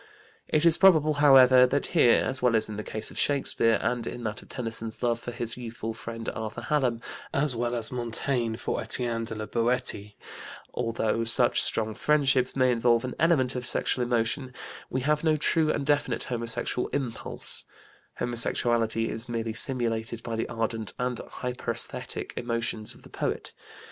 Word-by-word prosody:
It 155 +2 +1
is 170 -1 +5
probable, 155 -6 +5
however, 130 -3 +7
that 140 +2 0
here, 135 -9 +5
as 130 -1 -1
well 125 -2 +3
as 110 - +1
in 110 - -6
the 105 - -5
case 110 +1 -5
of - - -4
Shakespeare, 130 -5 +2
and 120 -2 -1
in 120 - -6
that 110 -1 -3
of - - -18
Tennyson's 115 -2 -5
love 120 -1 +1
for 120 - -7
his 120 0 -4
youthful 115 -2 -5
friend, 115 +1 -7
Arthur 110 +1 -5
Hallam, 125 -4 0 0.3
as 140 -2 +2
well 120 +1 -1
as 115 -2 +1
of 125 - -4
Montaigne 120 0 -1
for - - -3
Etienne 115 0 -1
de 110 - -4
la 110 0 -4
Boëtie, 115 -3 -1 0.6
although 115 -1 -1
such 115 +1 +2
strong 110 -1 +1
friendships 135 0 +2
may 130 -1 +3
involve 120 0 +2
an 130 - -4
element 140 -6 +3
of 125 -1 -2
sexual 125 +1 +1
emotion, 120 +2 -1 0.3
we 130 - -2
have 150 +3 +1
no 160 -1 +3
true 155 +1 +2
and 140 - -2
definite 145 0 +1
homosexual 115 0 -2
impulse; 130 -5 -3 0.5
homosexuality 115 -1 0
is 115 +3 -4
merely 115 -1 -2
simulated 115 -2 -1
by 115 - -4
the 115 - -3
ardent 115 -2 -2
and 125 -1 -2
hyperesthetic 125 -2 -4
emotions 115 -2 -2
of - - -19
the - - -14
poet. - - -3
120 Hz, 170 wpm, -27 LUFS, 115-130 Hz, 0.6 s, however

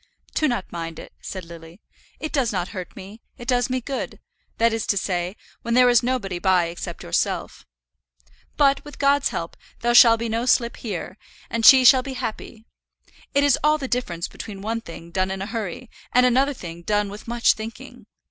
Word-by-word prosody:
"Do 310 - +2
not 240 -8 -3
mind 165 -1 -5
it," - - -11
said 185 -3 -7
Lily, 165 +1 -12 0.4
"it 310 - -5
does 260 -6 +1
not 185 -2 -2
hurt 185 -4 -7
me, 200 +3 -11 0.2
it 240 - -10
does 245 -1 +1
me 255 0 0
good; 270 +2 -5 0.4
that 230 0 +3
is 225 -2 -2
to 200 - +1
say, 180 0 -2 0.3
when 235 0 -1
there 250 0 +6
is 240 -1 +5
nobody 235 -8 -2
by 180 -2 +2
except 170 0 -7
yourself. 85 - -2 0.9
But, 280 -1 +3
with 295 -1 -11
God's 280 0 +3
help, - - -5 0.3
there 240 0 +2
shall 235 -1 +8
be 230 +1 -3
no 230 +2 -2
slip 235 -1 +2
here, 190 -3 -6 0.3
and 230 -1 -2
she 260 +2 +9
shall 255 +2 +8
be 265 +1 -6
happy. 230 -2 -6 0.7
It 280 - +4
is 285 - +4
all 305 0 +4
the 275 -3 -5
difference 180 -10 -2
between 200 -3 -9
one 225 +2 -2
thing 170 -3 -11
done 185 +1 0
in 190 0 -4
a 195 - -3
hurry, 220 +1 -5 0.2
and 250 0 +5
another 265 +3 +3 0.3
done 205 +2 0
with 205 +3 -10
much 235 0 +3
thinking. 220 +1 -9
230 Hz, 195 wpm, -23 LUFS, 190-250 Hz, 0.9 s, she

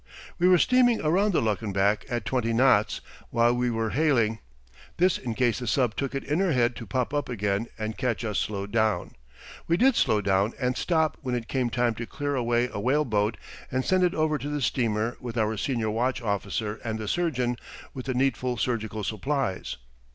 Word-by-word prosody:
We 175 - +4
were 185 -1 +7
steaming 245 +3 +4
around 190 +7 +2
the 175 - +1
Luckenbach 105 -1 0
at 120 -3 -2
twenty 115 0 0
knots 120 -3 +3 0.3
while 120 +1 +3
we 125 0 0
were 115 -2 -1
hailing: 120 -7 +2 0.6
this 180 +1 +3
in 120 -3 -4
case 120 -1 +1
the 125 - -5
sub 120 -2 +1
took 140 0 -3
it 135 - -2
in 150 +4 -1
her 190 -4 +2
head 120 -1 +2
to 115 - -8
pop 125 +7 -1
up 145 -3 -1
again 105 -1 -1
and 110 0 -3
catch 120 -2 -1
us 105 -2 -1
slowed 100 -1 -3
down. 110 -5 +1 0.6
We 170 - +2
did 260 +3 +4
slow 110 - +3
down 100 +2 +1
and 125 -1 0
stop 160 -1 +1
when 130 -4 -2
it 120 -1 -4
came 130 -3 0
time 120 -1 +1
to 115 +1 -6
clear 145 0 -3
away 120 -2 +1
a - - -3
whale 140 +7 +2
boat 105 -2 0 0.3
and 130 0 -1
send 185 -1 +3
it 180 - +2
over 155 -1 +1
to 145 - -4
the 150 0 -2
steamer 115 -1 0
with 120 -2 -6
our 110 0 +1
senior 115 -1 -1
watch 125 +4 0
officer 105 -1 -2
and 110 -2 -2
the 110 -1 -5
surgeon, 125 -5 0 0.4
with 130 0 -7
the 130 - -1
needful 125 -1 0
surgical 110 -3 -2
supplies. 110 - -2
120 Hz, 205 wpm, -26 LUFS, 110-140 Hz, 0.6 s, were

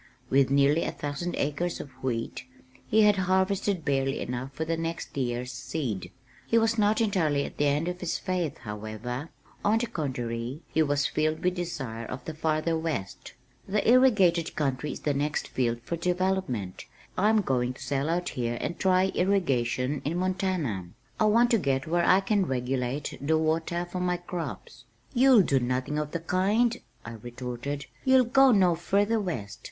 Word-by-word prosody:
With 135 0 +4
nearly 140 +3 +3
a - - -2
thousand 145 +5 -4
acres 165 +5 -1
of 140 - -8
wheat, 120 -1 -3 0.4
he 220 0 +4
had 210 -1 +5
harvested 190 -1 +1
barely 135 -1 0
enough 125 +2 -4
for 155 +4 -4
the 165 +1 0
next 165 0 -4
year's 125 -2 -2
seed. 125 - -4 0.4
He 230 - +3
was 225 0 +3
not 215 +1 +2
entirely 160 -10 +1
at - - -9
the 145 - +2
end 145 +4 +1
of 180 0 -3
his 180 -2 -2
faith, 180 -6 -2
however; 110 +7 -6 0.3
on 210 +2 +3
the 235 - 0
contrary, 125 - -4
he 160 - +3
was 145 -2 +1
filled 155 +1 0
with 180 0 +2
desire 135 -11 -4
of 125 0 -7
the 160 - -4
farther 155 +1 0
west. 160 -12 -4 0.3
"The 205 +1 0
irrigated 210 -10 +4
country 140 0 -1
is - - -9
the 145 - 0
next 145 +2 -1
field 120 -2 0
for 170 - -3
development. 180 - -1 0.3
I'm 215 +3 +3
going 125 -7 0
to - - -10
sell 140 +2 -1
out 175 +1 0
here 120 -1 -2
and 170 - -4
try 190 0 +3
irrigation 140 -8 +1
in 160 +4 -1
Montana. 185 - -1 0.3
I 215 - +4
want 235 +3 +4
to 230 - +4
get 135 -4 0
where 170 +2 +1
I 190 +1 +6
can 195 -1 +1
regulate 130 +2 -2
the 160 +3 +2
water 165 +2 0
for 175 +1 -5
my 180 0 0
crops." 175 -1 -7 0.3
"You'll 255 -4 +6
do 140 -5 +2
nothing 130 +4 -1
of 150 -1 -2
the 170 - -3
kind," 205 +7 +2 0.3
I 110 - -6
retorted. 120 +4 -5 0.2
"You'll 260 -1 +5
go 270 +2 +5
no 185 -5 +4
further 205 +6 +1
west. 125 - -4
160 Hz, 175 wpm, -27 LUFS, 130-185 Hz, 0.4 s, I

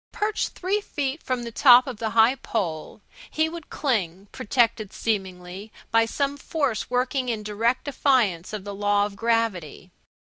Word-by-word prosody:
Perched 420 0 -2
three 395 +3 -1
feet 290 -5 -3
from 255 -2 -2
the 235 - -6
top 250 +1 +7
of 255 -5 -6
the 220 0 -2
high 225 +3 +6
pole 200 - -4 0.3
he 315 +1 +1
would 330 -1 -8
cling, 200 - -2
protected, 230 -4 0
seemingly, 190 -1 -4 0.2
by 225 0 +4
some 280 +4 -2
force 280 -6 -2
working 250 +1 0
in 220 -3 -2
direct 225 +4 0
defiance 245 - +1
of 215 -3 -5
the 205 0 -6
law 205 0 +1
of 205 -1 -7
gravity. 205 -7 -1
230 Hz, 155 wpm, -24 LUFS, 205-265 Hz, 0.3 s, top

